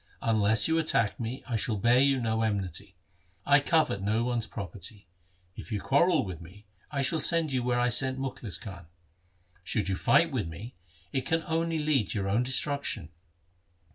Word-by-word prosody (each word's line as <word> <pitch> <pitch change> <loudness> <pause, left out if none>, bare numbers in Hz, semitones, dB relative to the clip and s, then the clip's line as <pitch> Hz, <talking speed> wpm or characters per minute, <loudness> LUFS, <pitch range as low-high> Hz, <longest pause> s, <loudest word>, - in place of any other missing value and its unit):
Unless 110 -1 +3
you 160 0 +2
attack 115 -9 +1
me 120 +4 -5
I 120 - -2
shall 110 +1 -1
bear 120 +4 +3
you 135 0 +3
no 110 -2 -1
enmity. 100 -3 -3 0.5
I 140 0 +6
covet 150 -8 +1
no 110 +4 0
one's 120 -2 -1
property. 100 +1 -8 0.5
If - - -10
you 105 - -1
quarrel 150 - +2
with 90 -3 -7
me 95 +6 -14 0.2
I 140 -2 -1
shall 160 +4 0
send 165 -3 +2
you 130 -1 0
where 120 0 0
I 125 0 +2
sent 130 +2 +2
Mukhlis 130 -7 -3
Khan. 95 -5 -10 0.8
Should 105 +1 -1
you 95 - 0
fight 170 - +3
with 120 -11 -2
me, 100 +10 -9 0.4
it 130 -1 -2
can 165 0 0
only 165 0 -1
lead 150 -8 +1
to - - -2
your 95 -1 -2
own 105 +5 +2
destruction. 130 - 0
120 Hz, 180 wpm, -28 LUFS, 100-140 Hz, 0.8 s, I